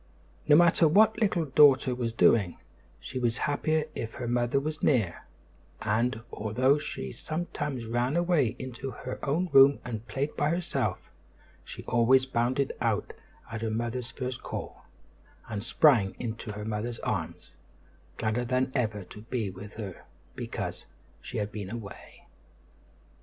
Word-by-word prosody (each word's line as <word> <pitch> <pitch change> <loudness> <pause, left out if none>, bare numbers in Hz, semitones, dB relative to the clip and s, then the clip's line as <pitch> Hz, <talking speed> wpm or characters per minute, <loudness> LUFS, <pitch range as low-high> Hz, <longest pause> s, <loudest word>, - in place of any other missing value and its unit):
No 150 - +7
matter 170 0 +6
what 215 +7 +4
Little 180 -6 +2
Daughter 135 -2 +5
was 120 -2 -2
doing, 105 -5 +3 0.4
she 130 - -5
was 120 -1 0
happier 155 +1 +1
if 115 0 -5
her 120 - -5
mother 120 +2 +1
was 155 +2 -4
near; 110 - +1 0.5
and, 115 +2 0
although 125 +7 +2
she 65 - -5
sometimes 150 - -4
ran 120 +5 0
away 170 -9 +2
into 130 +1 -6
her 130 0 -7
own 165 +7 0
room 135 +1 +8
and 115 -2 -5
played 140 +3 -2
by 145 - +1
herself, 170 +1 -2 0.5
she - - -9
always 125 +2 +4
bounded 130 +2 0
out - - 0 0.4
at 110 -1 -4
her 115 - -1
mother's 120 +2 -3
first 130 -1 -5
call, - - -7 0.6
and 105 -2 -4
sprang 115 -7 +4
into 115 -2 -5
her 105 +1 -6
mother's 110 +2 -3
arms, - - -4 0.6
gladder 110 +2 0
than 130 +2 0
ever 105 -4 -1
to 105 - -12
be 110 -3 -3
with 100 +3 -10
her 100 -5 -7 0.3
because - - -5 0.4
she - - -6
had 105 0 -2
been 100 -3 -6
away. 110 -2 -9
125 Hz, 145 wpm, -28 LUFS, 110-140 Hz, 0.6 s, room